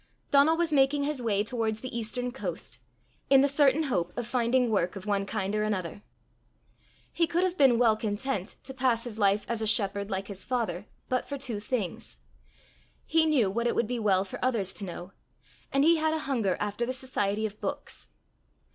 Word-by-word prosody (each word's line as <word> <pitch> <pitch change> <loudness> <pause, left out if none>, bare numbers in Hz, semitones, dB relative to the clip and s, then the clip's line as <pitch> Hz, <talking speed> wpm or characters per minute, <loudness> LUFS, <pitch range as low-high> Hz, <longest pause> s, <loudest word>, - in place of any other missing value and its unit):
Donal 290 +3 +5
was 335 -2 0
making 280 +1 +3
his 285 -2 -2
way 205 -3 +1
towards 220 -1 -2
the 255 -2 -6
eastern 240 +2 -3
coast, 265 - -6 0.5
in 270 -1 +7
the 280 - +4
certain 285 +1 +3
hope 180 - -1
of 240 - -2
finding 245 0 +1
work 185 -3 0
of 195 0 -8
one 200 -1 0
kind 200 -1 -2
or 210 - +1
another. 205 -3 -2 1.1
He 335 - +2
could 345 +3 +1
have 370 -1 0
been 265 -7 +5
well 230 -2 +4
content 215 -1 -3
to 265 - -6
pass 250 -3 +1
his 225 -3 -7
life 200 0 +2
as 230 -1 -2
a 220 - 0
shepherd 200 -2 +1
like 195 0 -3
his 195 -2 -7
father 210 -7 -2 0.2
but 255 -1 -1
for 280 - -3
two 250 -6 -3
things: 205 - -4 0.9
he 320 0 +3
knew 250 -11 +3
what 235 +3 0
it - - 0
would 235 - +2
be 240 +2 -3
well 195 -3 +2
for 195 - -8
others 225 -7 0
to 205 - -6
know; 175 +1 -8 0.6
and 275 0 +3
he 330 +2 +5
had 315 0 +1
a 315 - -3
hunger 225 -9 0
after 210 +3 -2
the 250 +2 -1
society 220 -5 -1
of 210 0 -6
books. - - -5
230 Hz, 200 wpm, -28 LUFS, 205-265 Hz, 1.1 s, in